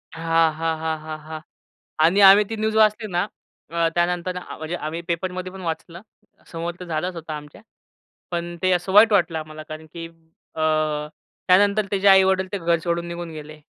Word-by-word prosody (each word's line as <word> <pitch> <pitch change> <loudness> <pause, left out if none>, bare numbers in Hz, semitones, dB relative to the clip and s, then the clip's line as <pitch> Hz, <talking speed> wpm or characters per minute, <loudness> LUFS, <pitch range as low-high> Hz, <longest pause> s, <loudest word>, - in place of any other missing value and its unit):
हां, 165 0 +2
हां, 160 +1 -2
हां, 160 0 -2
हां, 155 0 -6
हां 155 +1 -8 0.7
आणि 185 +5 +4
आम्ही 195 +1 +8
ती 225 - -3
न्यूज 220 0 -1
वाचली 215 0 +3
ना, 175 +3 +1 0.4
अ, 170 0 +1
त्यानंतर 180 +1 0
अ, 180 - -7
म्हणजे 160 +2 -4
आम्ही 160 0 -5
पेपरमधी 185 +2 -3
पण 190 0 -10
वाचलं, 170 +1 -5 0.5
समोर 170 +1 -4
तर 180 - -6
झालंच 170 +3 -2
होता 160 -2 -6
आमच्या. 150 +5 -12 0.7
पण 175 0 -4
ते 185 - +3
असं 180 +1 -1
वाईट 215 +2 +7
वाटलं 175 -4 +2
आम्हाला, 155 0 -8
कारण 155 +1 -8
की 170 -1 -7 0.5
अ, 160 - -6 0.9
त्यानंतर 200 +2 +4
तेचे 200 0 0
आई-वडील 190 -1 +5
ते 200 - -1
घर 170 -1 +1
सोडून 170 0 -1
निघून 170 0 -6
गेले. 155 0 -10
170 Hz, 180 wpm, -22 LUFS, 160-190 Hz, 0.9 s, आम्ही